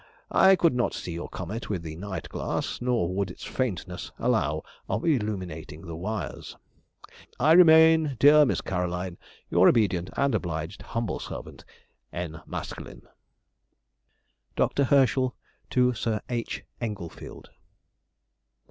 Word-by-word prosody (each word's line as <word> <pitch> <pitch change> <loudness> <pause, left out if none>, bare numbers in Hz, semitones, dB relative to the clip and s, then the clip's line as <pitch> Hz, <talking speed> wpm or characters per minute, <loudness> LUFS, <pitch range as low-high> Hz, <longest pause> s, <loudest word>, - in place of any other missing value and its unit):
I 190 0 +6
could 170 -4 +3
not 125 -1 0
see - - -5
your 85 +1 -5
comet 100 +6 -6
with 95 -5 -2
the 80 -1 -6
night 95 +3 -6
glass, - - -3
nor 120 -8 0
would 100 0 -1
its - - -10
faintness 95 -7 -3
allow 80 - 0 0.3
of 105 +3 -1
illuminating 95 - -2
the 85 -3 -7
wires. 95 +1 -5 0.8
I 150 +5 +4
remain, 160 -3 +7
dear 150 +3 +7
Miss 140 - +1
Caroline, 90 -1 -3 0.3
Your 90 +2 +6
obedient 95 -7 +1
and 140 0 +2
obliged 80 +2 -3
humble 115 -1 -3
servant, - - -8 0.5
N. 85 -2 -5
MASKELYNE. - - -7 1.5
DR. 140 - +2
HERSCHEL 130 -1 +3 0.3
TO 125 0 +3
SIR 110 -1 -1
H. 120 -2 -3 0.2
ENGLEFIELD. 100 -8 -7
105 Hz, 120 wpm, -27 LUFS, 90-130 Hz, 1.5 s, remain